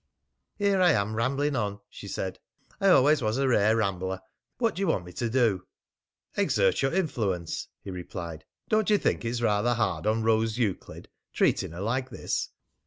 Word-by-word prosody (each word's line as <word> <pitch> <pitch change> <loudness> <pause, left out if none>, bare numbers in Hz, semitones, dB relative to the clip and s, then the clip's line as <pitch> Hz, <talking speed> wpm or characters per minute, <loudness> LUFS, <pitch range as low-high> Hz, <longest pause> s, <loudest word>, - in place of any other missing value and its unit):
"Here 200 -2 +2
I 175 -3 +6
am 105 -1 0
rambling 140 +5 0
on," 105 -4 -2
she 100 - -10
said. 95 -1 -4 0.4
"I 195 - +2
always 145 -2 +5
was 110 +1 0
a 135 0 +2
rare 110 -3 +4
rambler. 95 -3 -1 0.4
What 230 -2 +1
do 180 - -7
you 195 - +1
want 95 - 0
me 90 - -11
to 120 +4 -2
do?" 115 -6 +1 0.7
"Exert - - +2
your 135 - +1
influence," 105 - -1 0.2
he 100 - -6
replied. 85 -2 -7 0.2
"Don't 215 -1 +2
you 210 - +5
think - - 0
it's 120 +1 -2
rather 115 +2 +2
hard 95 -6 -1
on 110 +1 +1
Rose 110 0 +2
Euclid 110 -6 -3 0.3
treating - - +1
her 85 - -6
like 125 +5 -1
this? - - -3
115 Hz, 175 wpm, -27 LUFS, 100-135 Hz, 0.7 s, I